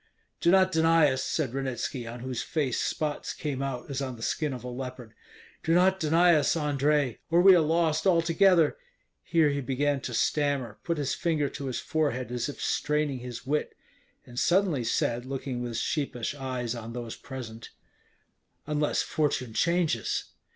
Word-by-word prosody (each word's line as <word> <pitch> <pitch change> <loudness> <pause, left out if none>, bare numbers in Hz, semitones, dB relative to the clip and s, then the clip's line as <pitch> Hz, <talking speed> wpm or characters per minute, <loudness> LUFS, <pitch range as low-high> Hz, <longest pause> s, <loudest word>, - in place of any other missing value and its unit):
"Do 170 - +3
not 185 +1 +5
deny 160 -3 +4
us," 130 0 -2
said 140 -7 -1
Ranitski, 130 -2 -3
on 120 +1 -7
whose 125 -1 -3
face 145 -6 -1
spots 150 -2 -2
came 140 -3 -4
out 135 -3 -4
as 135 0 -2
on 130 -2 -3
the 115 - -9
skin 150 +3 -1
of 125 -3 -6
a - - -6
leopard. 125 -2 -7 0.5
"Do 165 +1 +2
not 190 +2 +4
deny 170 +2 +4
us, 155 +1 +2
Andrei, 145 -3 +1
or 170 +1 +4
we 190 +2 +8
are - - +5
lost 160 +1 +1
altogether." 170 -1 +4 0.4
Here 160 -3 +3
he 140 0 -1
began 140 +2 0
to 120 - -4
stammer, 140 -7 0
put 170 -1 -1
his 145 -2 -1
finger 155 -5 0
to 140 -1 -6
his 130 - -2
forehead 140 -6 -1
as 125 +3 -2
if 145 - -8
straining 150 -3 0
his 125 -1 -8
wit, 150 +3 -1 0.5
and 120 0 -6
suddenly 175 -8 +2
said, 120 +1 0
looking 130 -1 -4
with 120 -2 -4
sheepish 140 -4 -2
eyes 130 -4 -3
on 115 -1 -7
those 120 -2 -5
present, 115 -4 -8 1.0
"Unless 150 -1 0
fortune 135 -6 -1
changes." 170 - 0
140 Hz, 170 wpm, -28 LUFS, 125-160 Hz, 1.0 s, we